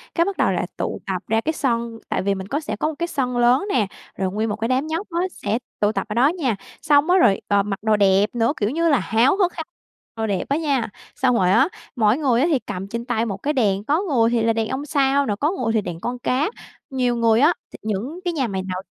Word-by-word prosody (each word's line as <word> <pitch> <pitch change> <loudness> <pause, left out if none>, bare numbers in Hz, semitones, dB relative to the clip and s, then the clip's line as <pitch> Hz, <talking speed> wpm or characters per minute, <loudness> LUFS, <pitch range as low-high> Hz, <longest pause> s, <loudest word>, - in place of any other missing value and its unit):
cái 335 - +3
bắt 395 0 -3
đầu - - +2
là - - -1
tụ - - -3
tập 190 -3 -2
ra 225 +1 +1
cái 315 +6 -1
sân 235 -5 -1
tại - - 0
vì 200 +1 0
mình 190 0 -6
có 285 +7 -1
sẽ 255 -9 -4
có 305 - -1
một 310 - -6
cái 340 - 0
sân 250 -6 -2
lớn 245 +9 +4
nè, 210 -6 +2 0.3
rồi 190 -1 -1
nguyên 220 +2 -1
một 205 - -1
cái 220 +2 -2
đám 260 +4 0
nhóc 330 +6 -3
á 340 - -1
sẽ 210 +4 -2 0.2
tụ 205 0 +2
tập 220 - -3
ở - - -2
đó 250 +3 +5
nha. 295 - 0 0.3
X 310 - -5
ong 290 +4 +5
á 370 - +5
rồi, 205 - +4
ờ, 200 -1 +3
mặc 195 -1 -4
đồ 220 -1 +3
đẹp 200 +2 +3
nữa, 235 +4 +2
kiểu 205 - 0
như 330 +5 +1
là, 285 -5 +4
háo 235 - +2
hức 365 -3 +2
háo 320 - -5 0.5
đồ 225 0 -2
đẹp 200 -3 -1
á 280 - +2
nha, 280 -7 0 0.3
xong 255 -2 +2
rồi 185 -4 +3
á, 230 +9 +5 0.3
mỗi 220 +1 +3
người 255 -6 +2
á 305 - +3
thì 285 -6 +2
cầm 195 -3 -6
trên 235 +3 -5
tay 230 -2 0
một 200 -4 -3
cái 290 +9 -1
đèn, 205 -7 +1
có 300 - +1
người 250 - +2
thì 235 -1 +1
là 230 - +3
đèn 225 -1 -1
ông 270 +2 -3
sao 280 -1 +2
nè, 210 - -1
có 300 +4 +2
người 235 -11 -1
thì 220 - +2
đèn 170 -3 -6
con 245 +6 -4
cá. 260 +7 0 0.4
Nhiều 250 -3 0
người 230 -1 +3
á 300 +6 +5 0.2
thì - - -10
những 220 - -3
cái 350 - 0
nhà 275 -6 0
mày 190 -3 -3
nào 185 0 -4
240 Hz, 280 wpm, -22 LUFS, 210-285 Hz, 0.5 s, đó